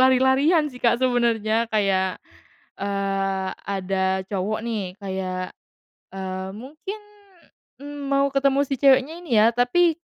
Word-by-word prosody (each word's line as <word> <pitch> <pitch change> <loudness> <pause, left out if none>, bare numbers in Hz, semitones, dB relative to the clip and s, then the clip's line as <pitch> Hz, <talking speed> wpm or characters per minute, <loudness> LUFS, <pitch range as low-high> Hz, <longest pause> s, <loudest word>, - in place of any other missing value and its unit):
lari-larian 265 +5 +4
sih 250 - -12
Kak 235 0 +3
sebenarnya 230 -2 +1
kayak, 195 -4 +1 0.6
eee, 195 -1 -1 0.2
ada 190 -1 -1
cowok 205 +2 -1
nih 205 -5 -3
kayak, 185 -2 -4 0.6
eee, 190 0 -4
mungkin, 310 - -8 1.1
mau 275 0 +3
ketemu 275 0 +3
si 275 - -1
ceweknya 275 +2 +4
ini 245 -11 +1
ya 220 - +6
tapi, 320 +8 +3
220 Hz, 115 wpm, -23 LUFS, 190-265 Hz, 1.1 s, ya